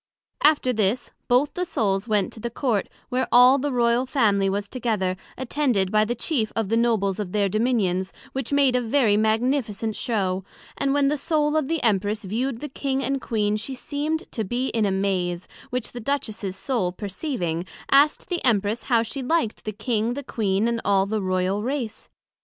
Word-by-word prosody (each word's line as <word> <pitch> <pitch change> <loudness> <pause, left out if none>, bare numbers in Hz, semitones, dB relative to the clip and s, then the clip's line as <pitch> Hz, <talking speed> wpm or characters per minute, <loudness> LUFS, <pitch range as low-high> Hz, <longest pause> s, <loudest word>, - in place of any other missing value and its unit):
After 290 -4 +4
this, 215 +2 0 0.2
both 255 +4 +3
the 360 - -2
Souls 205 - 0
went 210 -4 +1
to - - -10
the 235 - -3
Court, 235 -4 -1 0.2
where 255 0 0
all 250 +3 +7
the 285 +2 -1
Royal 240 0 +2
Family 205 -8 +2
was 200 +1 -2
together, 215 -7 -1 0.2
attended 250 -7 0
by 215 0 +4
the 240 +3 -2
chief 240 -3 0
of 225 -3 -1
the 225 - +2
Nobles 220 -4 +1
of 195 -4 -4
their 205 -1 +2
Dominions, 195 -4 0 0.2
which 265 -1 -4
made 280 -3 +4
a 250 - +2
very 230 -3 +3
magnificent 220 0 0
Show; 190 -5 -1 0.3
and 275 0 0
when 280 -1 +3
the 295 0 -1
Soul 300 0 +1
of 310 -4 +1
the 325 -1 -1
Empress 210 -1 +1
viewed 235 +5 -2
the 295 - -4
King 270 0 -2
and 275 0 -1
Queen, 210 -2 0
she 260 +5 -5
seemed 300 +5 -2
to 220 - -2
be 245 +6 -1
in 220 -3 +1
a - - 0
maze, 185 -2 -1 0.2
which 250 -2 -3
the 245 - -7
Duchess's 220 -6 -2
Soul 195 -4 -1
perceiving, 190 - -3 0.3
asked 285 +2 +4
the 350 -2 -2
Empress 220 -2 +2
how 235 -3 +3
she 265 +5 -5
liked 260 -4 -1
the 215 - -2
King, 220 +2 -1
the 285 - -5
Queen, 210 -3 0
and 235 -1 -1
all 195 -1 +3
the 215 +1 -2
Royal 185 +1 0
Race? 240 -2 -4
230 Hz, 190 wpm, -24 LUFS, 205-265 Hz, 0.3 s, all